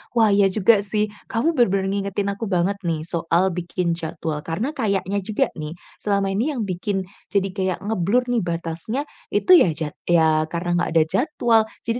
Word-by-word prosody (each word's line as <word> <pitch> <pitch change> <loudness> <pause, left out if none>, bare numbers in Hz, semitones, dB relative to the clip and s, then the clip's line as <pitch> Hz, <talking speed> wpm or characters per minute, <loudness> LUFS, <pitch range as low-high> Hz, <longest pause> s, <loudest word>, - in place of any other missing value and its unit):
Wah, 225 -3 +5
iya 200 0 +5
juga 205 +2 +4
sih. 210 +1 -1 0.2
Kamu 230 +9 +1
benar-benar 195 - +2
ngingetin 200 0 -2
aku 200 +3 -4
banget 190 +1 0
nih 165 -4 -2
soal 170 +2 +1
bikin 175 0 -2
jadwal, 160 -2 -4
karena 200 - -3
kayaknya 200 - -1
juga 210 +2 0
nih 155 +1 -6 0.2
selama 200 -1 0
ini 240 +10 0
yang 235 - -2
bikin 190 +1 -2 0.3
jadi 195 -1 +1
kayak 185 -2 -1
nge-blur 215 +3 +1
nih 235 - +2
batasnya 170 +7 -3 0.3
itu 370 - +2
ya 340 - +7
jad 155 -2 -3 0.2
ya 160 -2 +4
karena 175 +1 -3
nggak 175 - 0
ada 160 - +6
jadwal. 235 - +2 0.2
Jadi 230 +2 -1
195 Hz, 175 wpm, -22 LUFS, 170-215 Hz, 0.3 s, ya